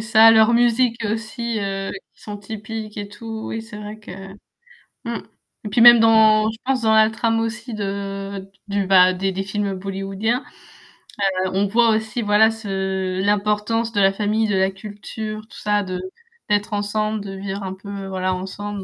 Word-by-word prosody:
Ça 220 Hz, 0 st, +4 dB
a -, -, +10 dB
leurs 220 Hz, +1 st, +5 dB
musiques 235 Hz, -1 st, +2 dB
aussi 225 Hz, +1 st, -3 dB
heu, 195 Hz, 0 st, -3 dB, 0.2 s
qui -, -, -23 dB
sont 205 Hz, -1 st, -7 dB
typiques 215 Hz, +1 st, -7 dB
et 205 Hz, -1 st, -5 dB
tout, 220 Hz, +1 st, -7 dB
oui 225 Hz, -, -4 dB
c'est 220 Hz, -1 st, -11 dB
vrai 210 Hz, +1 st, -8 dB
que 210 Hz, -, -12 dB, 0.9 s
mmh. 235 Hz, -1 st, -4 dB, 0.5 s
Et -, -, -3 dB
puis 220 Hz, +3 st, +2 dB
même 240 Hz, -1 st, +10 dB
dans 220 Hz, -1 st, +5 dB
je 220 Hz, -, -11 dB
pense 260 Hz, -1 st, 0 dB
dans 220 Hz, 0 st, +3 dB
la 220 Hz, 0 st, +5 dB
trame 225 Hz, 0 st, 0 dB
aussi 230 Hz, +1 st, -4 dB
de 195 Hz, -1 st, -4 dB
d 190 Hz, -, -11 dB, 0.3 s
du -, -, -1 dB
bah, 185 Hz, -1 st, +6 dB
des 190 Hz, +1 st, -1 dB
des 195 Hz, +1 st, -3 dB
films 200 Hz, 0 st, -2 dB
bollywoodiens. 195 Hz, +5 st, -2 dB, 1.0 s
Heu, -, -, -1 dB
on 200 Hz, -, +2 dB
voit 230 Hz, +3 st, +3 dB
aussi 220 Hz, +2 st, -1 dB
voilà 215 Hz, +1 st, +4 dB
ce 190 Hz, -3 st, -3 dB
l'importance 210 Hz, +3 st, 0 dB
de 205 Hz, -, 0 dB
la 195 Hz, 0 st, +4 dB
famille, 215 Hz, +2 st, 0 dB
de 205 Hz, -, 0 dB
la 190 Hz, 0 st, +2 dB
culture, 215 Hz, +2 st, -7 dB
tout -, -, -14 dB
ça 210 Hz, 0 st, +1 dB
de 185 Hz, -2 st, -4 dB, 0.5 s
d'être 205 Hz, +1 st, +1 dB
ensemble, 215 Hz, +1 st, -1 dB
de 195 Hz, -1 st, -7 dB
vivre 195 Hz, +1 st, -5 dB
un 190 Hz, 0 st, -4 dB
peu, 200 Hz, 0 st, -8 dB
voilà, 185 Hz, -1 st, -2 dB
ensemble. 200 Hz, +2 st, -6 dB
210 Hz, 185 wpm, -21 LUFS, 195-225 Hz, 1.0 s, a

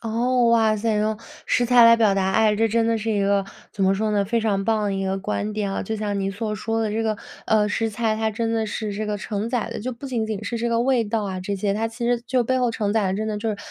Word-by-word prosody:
哦， 240 Hz, +2 st, +1 dB
哇 225 Hz, -2 st, +3 dB
塞， 220 Hz, +1 st, 0 dB
用 215 Hz, +1 st, 0 dB, 0.3 s
食 245 Hz, -, +2 dB
材 245 Hz, -1 st, +6 dB
来 230 Hz, 0 st, +8 dB
表 215 Hz, -4 st, +3 dB
达 190 Hz, -1 st, +1 dB
爱， 215 Hz, 0 st, +3 dB
这 225 Hz, +1 st, +3 dB
真 225 Hz, +1 st, +1 dB
的 230 Hz, -1 st, +1 dB
是 225 Hz, +1 st, -2 dB
一 205 Hz, -, +1 dB
个， 200 Hz, 0 st, +2 dB, 0.3 s
怎 195 Hz, -, 0 dB
么 190 Hz, -, +3 dB
说 215 Hz, +2 st, -1 dB
呢？ 205 Hz, -1 st, +1 dB
非 230 Hz, +3 st, 0 dB
常 200 Hz, -3 st, 0 dB
棒 220 Hz, 0 st, +1 dB
的 205 Hz, -1 st, 0 dB
一 195 Hz, 0 st, -2 dB
个 190 Hz, 0 st, -1 dB
观 210 Hz, +1 st, -3 dB
点 205 Hz, -2 st, -2 dB
啊。 -, -, -2 dB
就 220 Hz, -, -3 dB
像 205 Hz, -1 st, -2 dB
你 195 Hz, 0 st, -1 dB
所 210 Hz, +1 st, -3 dB
说 225 Hz, +3 st, -2 dB
的 215 Hz, -, -1 dB
这 225 Hz, +1 st, -1 dB
个， 215 Hz, -1 st, 0 dB, 0.3 s
呃， 210 Hz, -1 st, +3 dB
食 225 Hz, +2 st, 0 dB
材， 220 Hz, 0 st, -1 dB
它 220 Hz, 0 st, 0 dB
真 225 Hz, +1 st, -2 dB
的 220 Hz, -1 st, 0 dB
是 210 Hz, 0 st, -4 dB
这 210 Hz, +1 st, -3 dB
个 210 Hz, -1 st, -2 dB
承 205 Hz, +2 st, -3 dB
载 240 Hz, -4 st, -1 dB
的， -, -, -5 dB
就 255 Hz, +3 st, -3 dB
不 255 Hz, +4 st, -9 dB
仅 235 Hz, -4 st, -2 dB
仅 215 Hz, -1 st, -4 dB
是 235 Hz, -, -3 dB
这 235 Hz, +1 st, -1 dB
个 230 Hz, 0 st, +1 dB
味 250 Hz, -2 st, +2 dB
道 215 Hz, +1 st, -1 dB
啊 190 Hz, -2 st, -4 dB
这 200 Hz, +2 st, -3 dB
些， 200 Hz, +1 st, -1 dB
它 220 Hz, +2 st, -1 dB
其 230 Hz, +1 st, -6 dB
实 240 Hz, 0 st, +1 dB
就 255 Hz, 0 st, +2 dB
背 260 Hz, +2 st, 0 dB
后 245 Hz, -1 st, +1 dB
承 205 Hz, -2 st, -1 dB
载 215 Hz, -3 st, +1 dB
的 185 Hz, -, 0 dB
真 215 Hz, +2 st, -2 dB
的 210 Hz, -, -2 dB
就 225 Hz, +2 st, -2 dB
是， 210 Hz, -, -3 dB
220 Hz, 325 characters per minute, -23 LUFS, 205-230 Hz, 0.3 s, 来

